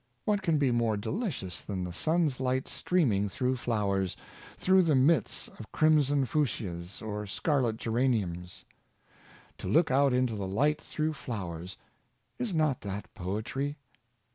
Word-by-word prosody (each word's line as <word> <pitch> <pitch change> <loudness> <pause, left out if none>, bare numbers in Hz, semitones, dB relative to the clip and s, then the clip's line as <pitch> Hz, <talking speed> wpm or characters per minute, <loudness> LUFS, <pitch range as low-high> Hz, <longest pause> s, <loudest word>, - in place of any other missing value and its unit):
What 205 -2 +2
can 165 -5 +2
be 140 -3 +2
more 115 -3 +1
delicious 110 - -3
than 95 -3 -4
the 90 -1 -5
sun's 155 - +1
light 130 0 0
streaming 110 - +1
through 125 +6 0
flowers 100 -6 0 0.2
— - - -17
through 190 0 +5
the 160 -5 +3
midst 145 +6 +2
of 110 - -10
crim 155 -1 +5
son 140 -1 +2
fuchias 100 - -2
or 105 -1 -4
scarlet 125 - 0
geraniums? 105 -7 -1 0.9
To - - -5
look 160 - +3
out 140 +1 +4
into 125 -2 +2
the 100 -2 -3
light 145 +10 +1
through 155 0 -2
flowers 95 - -6 0.3
— - - -44
is 245 -4 -1
not 155 -6 +1
that 100 +1 -6
poetry? 110 - -3
125 Hz, 150 wpm, -30 LUFS, 100-150 Hz, 0.9 s, through